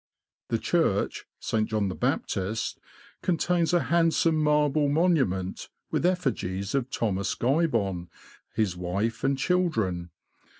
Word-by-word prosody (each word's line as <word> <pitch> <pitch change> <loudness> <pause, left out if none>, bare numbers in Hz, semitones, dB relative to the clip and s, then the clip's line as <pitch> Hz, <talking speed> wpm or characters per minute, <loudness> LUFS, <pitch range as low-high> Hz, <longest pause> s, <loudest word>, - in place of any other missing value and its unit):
The - - 0
church - - 0
(St. 110 -1 -1
John 105 -2 0
the 95 - -2
Baptist) 100 +4 -1 0.4
contains 175 -1 +1
a 175 -1 +3
hand 165 -1 +2
some 165 -1 +3
marble 150 -1 +3
monument, 140 - +1 0.2
with 175 - +2
effigies 110 - -1
of 135 -2 0
Thomas 100 -6 -1
Guybon, 115 - +1 0.5
his 105 -5 +1
wife 100 +6 -2
and 135 0 +2
children. 115 - 0
120 Hz, 120 wpm, -27 LUFS, 95-160 Hz, 0.5 s, a